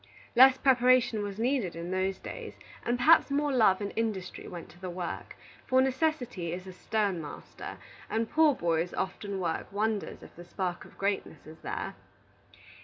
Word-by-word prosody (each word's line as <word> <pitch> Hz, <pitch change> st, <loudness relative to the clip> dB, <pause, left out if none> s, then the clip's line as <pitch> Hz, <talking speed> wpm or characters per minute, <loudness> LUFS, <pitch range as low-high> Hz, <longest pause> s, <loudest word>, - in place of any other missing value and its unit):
Less 260 Hz, +2 st, +8 dB
preparation 255 Hz, -3 st, +4 dB
was 205 Hz, -1 st, -4 dB
needed 235 Hz, -6 st, 0 dB
in 170 Hz, +2 st, -5 dB
those 190 Hz, +1 st, 0 dB
days, 475 Hz, -3 st, -8 dB, 0.3 s
and 240 Hz, +1 st, 0 dB
perhaps 315 Hz, +6 st, +6 dB
more 290 Hz, +1 st, +1 dB
love 215 Hz, -6 st, +4 dB
and 200 Hz, -, -3 dB
industry 220 Hz, -5 st, -3 dB
went 175 Hz, -2 st, -8 dB
to 175 Hz, -, -17 dB
the 185 Hz, -, -4 dB
work; 175 Hz, -1 st, -5 dB, 0.3 s
for 260 Hz, -, +4 dB
necessity 260 Hz, -, 0 dB
is 180 Hz, +2 st, -5 dB
a 185 Hz, -, -8 dB
stern 200 Hz, -2 st, -1 dB
master, 150 Hz, -2 st, -8 dB, 0.3 s
and 225 Hz, 0 st, 0 dB
poor 310 Hz, +1 st, +4 dB
boys 170 Hz, -1 st, 0 dB
often 195 Hz, +1 st, -3 dB
work 170 Hz, -3 st, -2 dB
wonders 210 Hz, +1 st, -2 dB
if -, -, -14 dB
the 175 Hz, -, -10 dB
spark 175 Hz, 0 st, -4 dB
of -, -, -17 dB
greatness 195 Hz, -6 st, -2 dB
is 155 Hz, +1 st, -12 dB
there. -, -, -4 dB
205 Hz, 170 wpm, -30 LUFS, 180-255 Hz, 0.3 s, Less